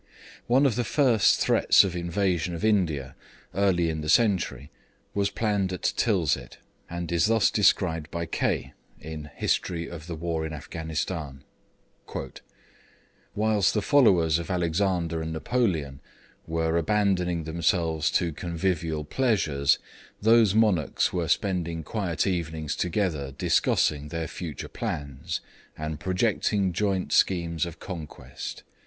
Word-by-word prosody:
One 130 +4 +4
of 125 -5 +2
the 120 - +1
first 120 -3 +3
threats - - +5
of 95 -3 -3
invasion 85 0 -1
of 85 - -3
India 80 -11 +1 0.4
early 95 -3 +2
in 80 -1 -2
the 75 - -4
century 85 - +2 0.4
was 100 -1 +1
planned 100 -2 0
at 90 - -1
Tilsit, 80 - 0 0.3
and 85 0 -5
is 85 +4 +3
thus 115 -1 +3
described 85 -6 +2
by 85 0 -3
Kaye:[Footnote: 80 -1 -4
History 85 -2 -1
of 85 -1 -9
the 85 - -4
War 80 0 -2
in 80 0 -4
Afghanistan] 75 -2 -5 1.9
'Whilst 105 -2 +2
the 105 - +2
followers 90 - +4
of 85 - -6
Alexander 85 -1 0
and 80 0 -4
Napoleon 80 - -1 0.5
were 80 0 0
abandoning 90 -2 +1
themselves 80 -1 0
to 85 -3 +1
convivial 85 -2 -2
pleasures, 80 - +2 0.4
those 110 -2 +5
monarchs 105 -9 +2
were 85 -3 -1
spending 85 -2 -1
quiet 90 -1 -1
evenings 80 -5 -2
together 85 -7 -1
discussing 75 +1 +1
their 80 +1 -4
future 80 -4 -6
plans, 70 -3 -4 0.4
and 75 0 -4
projecting 95 +1 0
joint 95 0 0
schemes 85 -2 +2
of 85 -1 -9
conquest. 75 -8 -7
85 Hz, 125 wpm, -26 LUFS, 80-100 Hz, 1.9 s, threats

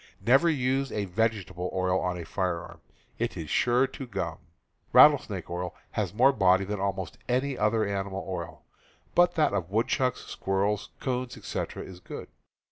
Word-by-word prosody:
Never 135 +8 +5
use 135 -2 0
a 105 -1 -1
vegetable 95 -3 -1
oil 95 0 +1
on 90 0 -1
a - - -5
P - - -8
^.. - - -17
firearm 85 -3 -3 0.2
— - - -35
it - - -2
is 80 -2 -5
sure 125 +2 +3
to 135 -1 -7
gum. 90 -7 -4 0.5
Rattlesnake - - +6
oil 90 +1 -4 0.2
has - - -1
more 130 +7 +5
body 95 -3 +4
than 105 +1 -3
almost 95 -2 -3
any 130 +2 +1
other 110 0 +2
animal 100 -1 -3
oil; 85 -3 -6 0.5
but 175 0 +4
that 155 -2 +3
of 85 - -1
woodchucks, 120 +4 0
squirrels, 100 +2 -1
'coons, 125 -1 -3
etc., - - -4
is 90 -2 -10
good. - - -8
100 Hz, 170 wpm, -28 LUFS, 90-125 Hz, 0.5 s, Rattlesnake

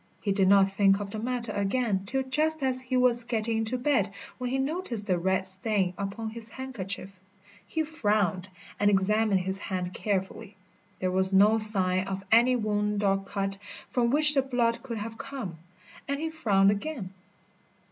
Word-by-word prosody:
He 200 - -2
did 195 -1 +2
not 195 0 +5
think 195 0 +3
of 200 -1 -6
the 215 - -5
matter 235 -1 -3
again 200 -1 -1
till 265 +4 -1
just 305 +3 -1
as 255 -1 0
he 255 0 -2
was 245 -1 +2
getting 230 -1 -1
into 225 +3 0
bed, 245 -6 +1 0.3
when 250 -1 -3
he 265 - -1
noticed 270 - -2
a 180 - +3
red 190 +1 0
stain 190 0 0
upon 200 +3 -5
his 230 0 -8
handkerchief. 200 -7 -6 0.5
He 320 +6 -1
frowned 205 - -1 0.3
and 205 - +3
examined 205 0 +2
his 190 +1 0
hand 185 -2 -4
carefully. 200 +1 -3 0.4
There 185 0 -2
was 190 +1 +1
no 210 +3 +5
sign 190 -3 +5
of 195 0 -5
any 240 +3 +5
wound 210 -2 -1
or 195 -1 +2
cut 195 0 -4 0.3
from 240 -2 +1
which 300 +3 +6
the 275 - +3
blood 240 -3 -1
could 235 -3 -6
have 225 +1 -7
come, 200 - -7 0.5
and 280 0 -2
he 320 +1 -3
frowned 200 -10 +3
again. 205 -3 -5
215 Hz, 175 wpm, -27 LUFS, 195-250 Hz, 0.5 s, which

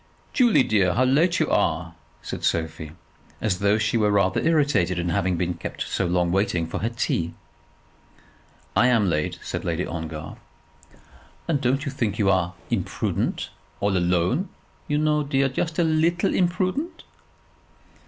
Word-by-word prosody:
"Julie, 240 - +4
dear, 95 -6 +2
how 130 - +3
late 155 +7 +3
you - - +2
are," - - +1 0.3
said - - -6
Sophie, 80 -1 -2 0.5
as 95 -5 -1
though 100 +1 +3
she 110 +1 +1
were 105 -2 +3
rather 100 -2 +2
irritated 145 - +2
in 85 0 -1
having 90 +1 0
been 90 +1 -1
kept 85 - -5
so 95 - -1
long 90 0 +1
waiting 95 -3 +1
for - - -4
her 115 - -1
tea. 85 -7 -2 1.4
"I 120 - +5
am 110 -7 +3
late," 75 -1 -1
said - - -4
Lady 85 +1 -1
Ongar. 80 -2 -6 1.1
"And 145 -5 0
don't 135 +4 +1
you 140 - -2
think 105 -5 -2
you 100 -2 +3
are 90 -2 0 0.2
imprudent, - - -2 0.3
all 100 -1 +1
alone, 90 - +1 0.4
you 150 - 0
know, 150 0 +2
dear; 140 -1 +1
just 155 +5 -3
a 175 - +3
leetle 165 +3 +2
imprudent." 185 - -1
105 Hz, 155 wpm, -24 LUFS, 90-150 Hz, 1.4 s, I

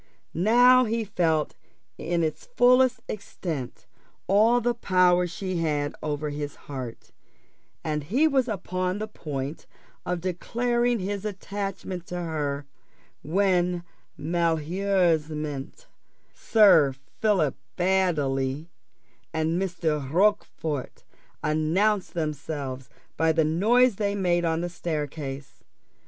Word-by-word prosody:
Now 245 +7 +5
he 225 0 -1
felt 165 -7 0 0.4
in 170 +1 -1
its 160 - -3
fullest 250 - +4
extent 165 - -5 0.4
all 220 +5 +4
the 240 0 +1
power 180 -5 +3
she 180 +2 -4
had 150 -3 -1
over 150 0 -2
his 145 0 -5
heart, 130 -5 -7 0.7
and 150 -2 -2
he 265 - +3
was 265 -4 +2
upon 185 -3 -2
the 215 +1 -4
point 145 -7 -6 0.4
of 180 0 -2
declaring 240 +7 0
his 200 0 -3
attachment 195 -3 -5
to 180 - -6
her, 150 -5 -2 0.6
when 180 0 +1 0.3
malheureusement 165 - 0 0.5
Sir 165 - +5 0.2
Philip 190 - +2 0.2
Baddely 155 -6 0 0.6
and 160 +2 0
Mr. 160 -7 -2
Rochfort 165 -6 0 0.4
announced 175 +8 +1
themselves 145 -4 -4 0.3
by 160 0 +3
the 160 -1 +2
noise 215 +8 +3
they 200 -1 0
made 175 -3 +1
on 165 0 0
the 175 - -2
staircase. 145 -5 -5
175 Hz, 105 wpm, -26 LUFS, 150-200 Hz, 0.7 s, Now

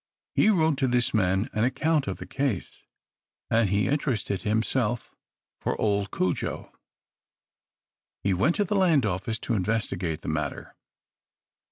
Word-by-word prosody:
He - - +4
wrote 160 -7 +3
to 135 - +2
this 125 -1 +1
man 95 0 +2
an 105 - +1
account 145 +4 +1
of - - -3
the - - -8
case; 135 -10 -3 0.7
and 115 -3 +3
he 100 +2 +2
interested 125 -9 -1
himself 110 +2 0 0.5
for - - -2
old 100 -2 +1
Cudjo. 90 -2 -2 1.5
He 100 - +2
went 140 - +2
to 205 - +2
the 200 - -2
land 170 - +4
office 100 +3 -2
to - - -1
investigate 95 -6 -1
the - - -9
matter. 75 0 -3
110 Hz, 140 wpm, -27 LUFS, 100-140 Hz, 1.5 s, He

